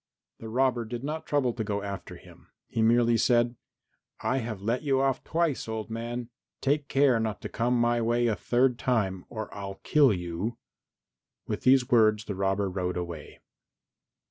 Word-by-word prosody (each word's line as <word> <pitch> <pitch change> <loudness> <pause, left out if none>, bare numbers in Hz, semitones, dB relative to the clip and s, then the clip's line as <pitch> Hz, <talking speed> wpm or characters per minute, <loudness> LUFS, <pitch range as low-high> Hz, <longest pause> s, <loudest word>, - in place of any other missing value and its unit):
The 110 - -8
robber 125 0 +1
did 120 +2 -6
not 155 +2 -4
trouble 135 -5 +1
to 110 - -3
go 100 -1 -2
after 100 -1 -6
him, - - -16 0.2
he 115 - -2
merely 115 +1 +4
said, 120 0 +3 0.7
"I 125 +5 0
have 110 -4 -5
let 115 +5 -1
you 135 -3 +1
off 135 -1 +1
twice, 165 -6 0
old 110 0 -4
man; 120 +1 -4 0.3
take 145 +1 0
care 135 -4 +3
not 110 -2 -2
to - - -5
come 120 +1 0
my 120 0 +2
way 120 +1 +1
a 115 -3 +2
third 125 +1 +1
time, 95 -7 0
or 110 -2 -6
I'll 100 -1 -7
kill 145 -5 +5
you." 90 +5 -3 0.9
With - - -3
these 130 0 +4
words 110 -2 +4
the 105 - -3
robber 95 +1 0
rode 90 -1 -2
away. 85 -4 -7
115 Hz, 170 wpm, -28 LUFS, 105-125 Hz, 0.9 s, kill